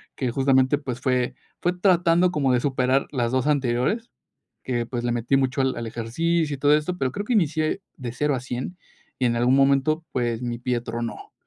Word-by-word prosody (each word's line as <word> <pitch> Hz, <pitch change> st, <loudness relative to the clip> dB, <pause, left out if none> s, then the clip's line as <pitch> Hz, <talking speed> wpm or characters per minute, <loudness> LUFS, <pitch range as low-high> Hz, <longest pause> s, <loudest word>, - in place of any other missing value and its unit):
que 125 Hz, -3 st, -1 dB
justamente 130 Hz, +1 st, +3 dB
pues, 130 Hz, -4 st, -5 dB
fue 125 Hz, -2 st, 0 dB, 0.3 s
fue 175 Hz, +1 st, +1 dB
tratando 180 Hz, -1 st, +3 dB
como 140 Hz, -5 st, +1 dB
de 125 Hz, -, +3 dB
superar 130 Hz, 0 st, +1 dB
las 120 Hz, -4 st, -1 dB
2 130 Hz, +2 st, 0 dB
anteriores, 140 Hz, -, 0 dB, 0.5 s
que 120 Hz, -2 st, -1 dB
pues 120 Hz, -1 st, -4 dB
le 120 Hz, -, +1 dB
metí 120 Hz, +3 st, +1 dB
mucho 135 Hz, 0 st, 0 dB
al 130 Hz, -2 st, +1 dB
al 115 Hz, -1 st, -4 dB
ejercicio 150 Hz, +8 st, -1 dB
y -, -, -7 dB
todo 145 Hz, +1 st, +4 dB
esto, 175 Hz, +4 st, -2 dB
pero 130 Hz, -1 st, -1 dB
creo 205 Hz, +1 st, -4 dB
que 250 Hz, -, -1 dB
inicié 160 Hz, -1 st, +1 dB
de 120 Hz, -3 st, -6 dB
0 145 Hz, +2 st, 0 dB
a 125 Hz, -, -2 dB
100 130 Hz, +8 st, -5 dB, 0.4 s
y 125 Hz, -, +2 dB
en 120 Hz, 0 st, +1 dB
algún 125 Hz, +3 st, +3 dB
momento 140 Hz, +4 st, +3 dB
pues, 120 Hz, -1 st, -1 dB
mi 120 Hz, -1 st, -3 dB
pie 125 Hz, -1 st, -1 dB
tronó, 115 Hz, 0 st, -6 dB
130 Hz, 205 wpm, -24 LUFS, 120-150 Hz, 0.5 s, todo